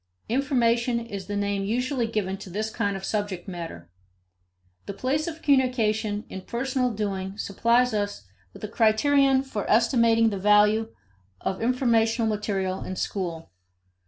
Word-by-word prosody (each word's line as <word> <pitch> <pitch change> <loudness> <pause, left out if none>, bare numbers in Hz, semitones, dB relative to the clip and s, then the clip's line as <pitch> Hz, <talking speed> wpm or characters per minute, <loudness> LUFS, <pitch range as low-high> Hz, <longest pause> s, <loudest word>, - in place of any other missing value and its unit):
Information 240 -2 +1
is 205 -5 -7
the 205 - -3
name 200 -1 -1
usually 245 +3 -1
given 205 -4 -2
to 195 -1 -10
this 215 +4 -3
kind 205 -4 -1
of 190 - -7
subject 205 -4 -3
matter. 165 - -7 1.0
The 200 - -5
place 275 +8 -1
of 325 -1 -7
communication 225 -6 +1
in 190 - -7
personal 255 +3 -1
doing 200 -3 -3
supplies 235 +4 +2
us 205 - -2 0.3
with - - -14
a - - -2
criterion 265 +5 +3
for 220 -7 -5
estimating 230 0 +4
the 200 - -3
value 210 +2 +4 0.5
of 190 - -3
informational 230 -2 +2
material 195 -3 -2
in 185 - -5
school. 175 -5 -4
220 Hz, 140 wpm, -25 LUFS, 200-240 Hz, 1.0 s, estimating